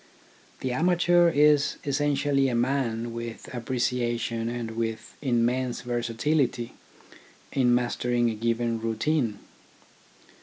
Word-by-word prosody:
The 130 - -2
amateur 175 +4 +4
is 150 -2 +3
essentially 140 -1 +1
a 120 - -1
man 120 -2 0
with 115 -1 -6
apprecia 120 0 -1
tion 115 0 -2
and 120 -1 -4
with 110 -1 -4
immense 125 -1 0
versatility 120 +1 -1 0.8
in 125 -3 +3
mastering 120 0 0
a - - -3
given 115 +1 -1
routine. 115 0 0
120 Hz, 105 wpm, -26 LUFS, 115-140 Hz, 0.8 s, amateur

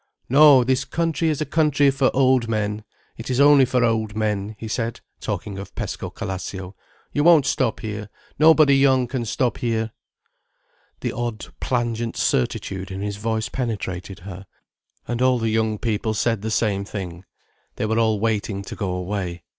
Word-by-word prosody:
"No, 140 -1 +7
this 130 +1 +1
country 165 0 -1
is 155 -1 -1
a - - 0
country 145 -2 +3
for 135 -1 +2
old 130 -3 +3
men. 105 -1 -1 0.3
It 115 - -7
is 130 0 0
only 140 -1 +7
for 125 0 +1
old 110 -2 0
men," 105 -1 -1
he 110 - -7
said, 115 +1 -3 0.2
talking 100 -2 -4
of 100 - -9
Pescocalascio. 95 0 -5 0.4
"You 145 - +1
won't 160 -4 +6
stop 130 -4 0
here. 105 -1 -5 0.3
Nobody 155 -2 +6
young 135 -2 +4
can 120 -1 -3
stop 120 +2 -1
here." 115 -2 -1 1.1
The - - -1
odd 120 -2 -4
plangent 120 -2 -2
certitude 95 +9 -1
in 95 0 -6
his 100 0 -3
voice 110 +1 -1
penetrated 100 -7 -4
her. 95 +1 -9 0.6
And 120 0 -2
all 130 -1 +4
the 115 -1 -1
young 110 -1 +1
people 110 0 -1
said 115 -1 0
the 110 - -3
same 105 -3 0
thing. 95 -4 -6 0.5
They - - -2
were 110 +1 +1
all 110 -2 +2
waiting 105 -2 -1
to - - -8
go 100 -3 -3
away. 90 -1 -3
115 Hz, 165 wpm, -22 LUFS, 105-130 Hz, 1.1 s, No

